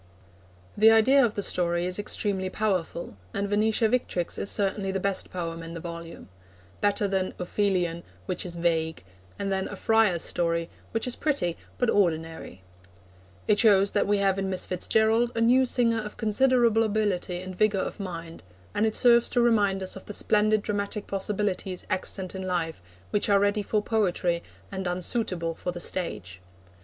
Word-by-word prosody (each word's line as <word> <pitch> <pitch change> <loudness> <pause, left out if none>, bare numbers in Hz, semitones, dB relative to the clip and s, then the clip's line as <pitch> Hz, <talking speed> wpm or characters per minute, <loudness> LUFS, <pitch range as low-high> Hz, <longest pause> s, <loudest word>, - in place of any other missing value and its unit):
The 215 +2 +6
idea 255 +5 +5
of 225 -3 0
the 205 - -2
story 175 -1 +1
is 180 +2 -2
extremely 200 -2 -1
powerful, 185 - -2 0.2
and 200 0 -1
Venetia 215 +2 +2
Victrix 215 -7 -1
is 200 - -1
certainly 195 -1 0
the 190 - -1
best 195 0 -1
poem 165 -2 -4
in 165 +1 -8
the - - -5
volume 170 0 -8 0.5
better 205 0 +1
than 190 -1 -1
Ophelion, 180 -2 0 0.2
which 180 - -2
is 175 -2 -6
vague, 160 - -1 0.3
and 200 -1 -3
than 190 0 -1
A - - -7
Friar's 220 -6 +2
Story, 170 -1 -1 0.2
which 225 - -2
is 250 - -2
pretty 275 - 0 0.2
but 245 - +1
ordinary. 165 - -1 0.8
It 205 - +3
shows 200 -3 +5
that - - +1
we 205 0 +2
have 195 -1 +1
in 195 0 -2
Miss 185 -1 0
Fitz 180 -1 -4
Gerald 225 +2 +3
a - - -1
new 255 +3 +4
singer 230 -2 +2
of 210 0 -8
considerable 235 0 +3
ability 205 -5 0
and 185 0 -7
vigour 205 -1 +2
of - - -6
mind, 170 -4 -7 0.3
and 220 - +2
it 220 - -2
serves 235 -1 +5
to 245 - 0
remind 205 -5 +2
us 185 - 0
of 190 - -11
the 210 - -6
splendid 215 0 +2
dramatic 205 0 -3
possibilities 195 -2 -2
extant 185 0 -3
in 190 - -5
life, 175 - -2 0.3
which 205 - +2
are 200 -1 +5
ready 205 +1 +1
for 210 +1 -1
poetry, 180 -6 0 0.3
and 190 -1 -4
unsuitable 180 -1 -1
for 180 - -4
the 175 - -7
stage. 105 - -4
195 Hz, 175 wpm, -26 LUFS, 175-215 Hz, 0.8 s, The